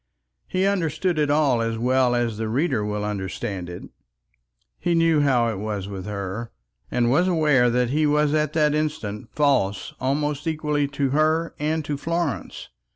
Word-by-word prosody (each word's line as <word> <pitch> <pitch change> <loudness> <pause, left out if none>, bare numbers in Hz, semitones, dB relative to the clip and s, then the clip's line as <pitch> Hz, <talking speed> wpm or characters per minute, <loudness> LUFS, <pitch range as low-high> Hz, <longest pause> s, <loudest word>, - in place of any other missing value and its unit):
He 185 0 0
understood 180 -3 0
it 150 -1 +2
all 145 -5 +3
as 115 0 -1
well 125 +1 +2
as 120 -3 -1
the 110 -1 -2
reader 130 -2 0
will 105 0 -2
understand 95 -2 -4
it. 90 - -8 1.0
He 175 -1 +1
knew 165 -2 +3
how 125 -5 +3
it 105 -4 -4
was 105 -2 -3
with 95 -1 -6
her, 105 +3 -5 0.4
and 120 -1 +1
was 175 +7 +3
aware 150 -8 +3
that 125 0 +1
he 155 +1 +2
was 150 0 +2
at 150 -1 +1
this 150 -2 +3
instant 130 -9 -3
false 130 -10 +1
almost 145 +3 -1
equally 150 -2 0
to 140 -1 -1
her 155 +3 +1
and 155 +1 -1
to 145 -1 -2
Florence. 165 -2 -3
140 Hz, 165 wpm, -23 LUFS, 115-155 Hz, 1.0 s, all